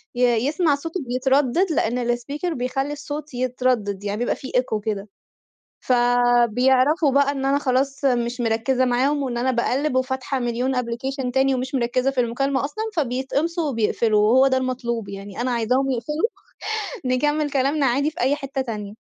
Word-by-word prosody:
ي 245 - -2 0.3
يسمع 305 0 +2
صوته 330 +6 -5
بيتردّد 265 +7 +2
لإن 240 -3 0
الspeaker 290 +8 -4
بيخلّي 270 +3 -2
الصوت 295 0 -6
يتردّد، 245 -5 -1
يعني 205 +3 -2
يبقى - - 0
في 265 - -9
echo 235 -4 0
كده. 205 -2 -3 0.8
فبيعرفوا 245 +4 +3
بقى 280 0 +3
إن 270 -1 -4
أنا 275 +1 +2
خلاص 270 0 0
مش 245 -1 +1
مركّزة 240 +3 +1
معاهم 265 +4 +1
وإن 250 -3 -2
أنا 255 +2 +1
باقلّب 260 +3 0
وفاتحة 260 +1 -1
مليون 245 +2 -1
application 250 +2 -2
تاني 265 0 +3
ومش 255 +1 -3
مركّزة 255 +1 +1
في 265 -2 -1
المكالمة 265 +3 0
أصلًا، 360 +10 -3
فبيتقمصوا 290 +4 -1
وبيقفلوا 220 -2 +1
وهو 250 +6 +5
ده 260 -1 +2
المطلوب 240 -4 -2
يعني، 200 +2 -7
أنا 255 - 0
عايزاهم 250 +3 +1
يقفلوا، 300 - -1 0.9
نكمّل 295 +2 +1
كلامنا 280 +1 +1
عادي 275 +4 +1
في - - -12
أي 265 +4 +2
حتّة 275 -1 -4
تانية. 210 -4 -6
255 Hz, 155 wpm, -22 LUFS, 240-280 Hz, 0.9 s, وهو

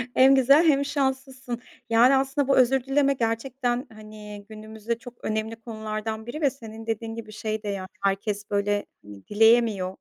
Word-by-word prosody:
Hem 270 +1 +6
güzel, 275 +5 +5
hem 280 -2 +3
şanslısın. 265 -3 -3 0.3
Yani, 240 +4 +5
aslında 270 +1 0
bu 275 - +3
özür 255 0 +4
dilemek 275 0 +1
gerçekten, 245 +2 -1
hani, 210 -1 -11
günümüzde 220 +1 -5
çok 245 0 -11
önemli 220 +1 -2
konulardan 220 -1 -5
biri 295 +7 -6
ve 285 - +4
senin 225 -4 -11
dediğin 225 0 -3
gibi, 220 -2 -8
şey 215 0 -4
de - - -6
yani, 190 -2 -4 0.2
herkes 200 +1 -1
böyle, 205 0 0 0.2
hani, 100 -1 -13
dileyemiyor. 220 -3 +3
225 Hz, 160 wpm, -25 LUFS, 215-265 Hz, 0.3 s, Hem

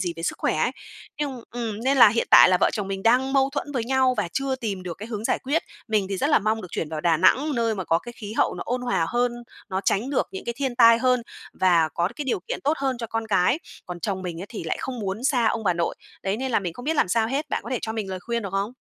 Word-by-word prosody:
gì 175 -2 -1
về 165 - -7
sức - - -2
khỏe - - 0
ấy. - - +1 0.5
Nhưng 270 -5 -3
ừm, 230 -3 -4
nên 275 +1 +3
là 230 - +10
hiện 230 +3 0
tại - - +9
là 185 - +4
vợ - - +4
chồng 205 -3 -3
mình 195 0 -4
đang 255 +4 +3
mâu 270 0 +3
thuẫn 290 0 -4
với 240 -4 -1
nhau 260 0 +2
và 205 -5 -1
chưa 270 -1 -1
tìm 205 -7 -4
được 175 -2 -6
cái 215 - -7
hướng 220 -2 -5
giải - - +1
quyết. 290 +5 0 0.3
Mình 210 -3 +1
thì 195 - -2
rất 285 +9 0
là - - +6
mong 215 +1 -1
được 180 - -8
chuyển 155 - -3
vào 155 -1 -4
Đà 165 0 +3
Nẵng, 280 - +3
nơi 230 -2 +1
mà 190 -3 -4
có 165 - +2
cái 240 +4 -10
khí 215 -3 -8
hậu - - +1
nó - - -5
ôn 250 +1 -1
hòa 205 -9 0
hơn, 245 0 +1 0.4
nó 190 0 -2
tránh 235 +8 +1
được 275 - 0
những 190 - -6
cái 235 - -3
thiên 265 -3 -2
tai 230 -1 +7
hơn 250 -1 +2 0.3
và 170 -4 +3
có 170 +2 +1
được - - -15
cái 295 - -4
điều 240 -8 -1
kiện - - -3
tốt 295 +3 +3
hơn 265 -3 -1
cho 230 - -4
con 225 0 -3
cái. 200 - +2 0.3
Còn 175 -1 -7
chồng 190 0 -2
mình 170 -2 -5
ấy 195 - -6
thì 215 - -7
lại 160 - -1
không 255 -2 -5
muốn 200 +4 -4
xa 245 -4 +2
ông 220 0 0
bà 180 - +3
nội. 170 0 -1 0.3
Đấy 195 +1 -1
nên 260 +3 -3
là - - +4
mình 175 -3 -4
không 245 - -10
biết 315 +1 0
làm 185 - +3
sao 220 +3 +2
hết. 280 +5 -2
Bạn - - -1
có - - -8
thể 255 - 0
cho 220 - -3
mình 215 -4 -4
lời 185 -1 -5
khuyên 235 +3 -3
được 195 - -5
không? 200 +4 -1
225 Hz, 310 wpm, -24 LUFS, 190-255 Hz, 0.5 s, là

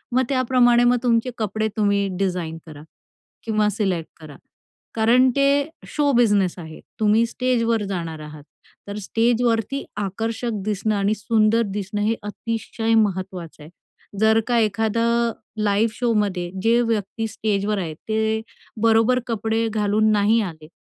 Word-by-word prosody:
मग 260 - +4
त्याप्रमाणे 250 -2 +3
मग 245 0 +4
तुमचे 235 0 +1
कपडे 215 0 -1
तुम्ही 200 -1 +2
डिझाइन 180 -4 -2
करा 150 -3 -11 0.6
किंवा 215 -1 +1
सिलेक्ट 190 -6 -2
करा. 150 -3 -11 0.6
कारण 240 +4 +4
ते 275 0 +3 0.4
शो 290 -2 +1
बिझनेस 205 -7 +3
आहे. 160 -1 -9 0.2
तुम्ही 215 +2 +3
स्टेजवर 230 -2 0
जाणार 165 -4 -4
आहात. 150 -1 -10 0.4
तर 200 +1 -5
स्टेजवरती 230 +4 0
आकर्षक 225 +4 -3
दिसणं 210 0 -1
आणि 200 +1 +1
सुंदर 215 +1 +2
दिसणं 205 0 -3
हे 220 +2 +1
अतिशय 225 +1 -3
महत्त्वाचं 185 -6 -1
आहे. 150 - -12 0.5
जर 220 +1 +4
का 240 -1 +2
एखादा 220 +1 0 0.6
लाईव्ह 210 +2 +2
शोमध्ये 205 -7 0
जे 230 +1 +4
व्यक्ती 225 -1 -2
स्टेजवर 210 -1 -1
आहे 170 -5 -3
ते 220 0 0 0.4
बरोबर 225 +2 +4
कपडे 225 0 -1
घालून 215 +1 +2
नाही 210 +2 +3
आले, 160 -6 -7
215 Hz, 135 wpm, -22 LUFS, 200-230 Hz, 0.6 s, मग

